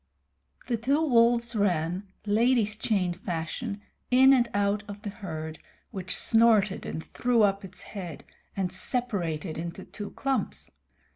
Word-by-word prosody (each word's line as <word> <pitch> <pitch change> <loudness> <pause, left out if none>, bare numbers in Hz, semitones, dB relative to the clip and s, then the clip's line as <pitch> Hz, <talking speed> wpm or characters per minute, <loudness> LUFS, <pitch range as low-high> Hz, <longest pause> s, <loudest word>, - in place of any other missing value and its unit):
The 235 - 0
two 270 +7 +2
wolves 235 -1 +4
ran, 180 -1 0 0.2
ladies' 215 0 +3
chain 195 -5 0
fashion, 185 +5 -4 0.3
in 265 +2 +7
and 240 -3 +3
out 205 0 +1
of 205 +1 -9
the 205 - -4
herd, 160 -7 -6 0.3
which 185 -2 -3
snorted 220 -4 +3
and 160 - -4
threw 240 -2 +2
up 200 -1 +2
its 185 -1 -9
head, 180 -7 -7 0.3
and 185 -2 0
separated 190 - -2
into 170 +3 -6
two 205 -1 -7
clumps. 270 -1 -2
205 Hz, 135 wpm, -28 LUFS, 180-235 Hz, 0.3 s, in